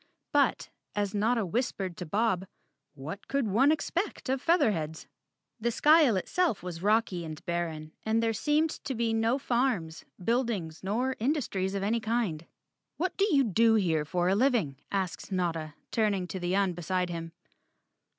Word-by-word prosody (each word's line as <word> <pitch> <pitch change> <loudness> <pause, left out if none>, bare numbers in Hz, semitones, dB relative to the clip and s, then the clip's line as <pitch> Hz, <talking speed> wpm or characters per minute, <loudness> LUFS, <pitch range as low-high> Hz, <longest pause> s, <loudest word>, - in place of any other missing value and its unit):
But, - - +2 0.2
as 205 -2 -1
Notta 220 +1 +1
whispered 190 -3 -2
to 180 - -6
Bob, 195 0 0 0.5
what 155 +8 -7
could 275 -2 0
one 250 +9 +4
expect 335 0 -2
of 265 0 0
Featherheads? 195 - +1 0.5
The 235 +2 0
skyle 295 -1 +5
itself 335 - 0
was 175 -2 -6
rocky 205 -3 +2
and 155 -1 -8
barren 165 -3 -3
and 225 +1 +1
there 225 0 +1
seemed 300 +7 +1
to 265 - -2
be 230 -1 0
no 225 +3 +2
farms, 235 -12 -1 0.2
buildings 220 -9 -1
nor 245 +7 0
industries 215 -8 -1
of 195 - -2
any 225 +4 +1
kind. 215 -8 -1 0.5
"What 370 +3 -1
do 400 - +2
you 280 -6 +4
do 225 0 +4
here 165 -7 +2
for 175 +3 0
a 185 - +3
living?" 210 - +2
asked 195 -1 -3
Notta, 165 -5 -2 0.2
turning 205 -5 +1
to 190 - -4
the 175 +1 -1
Un 195 -2 +2
beside 175 +1 -1
him. 165 -1 -5
205 Hz, 160 wpm, -29 LUFS, 175-240 Hz, 0.5 s, skyle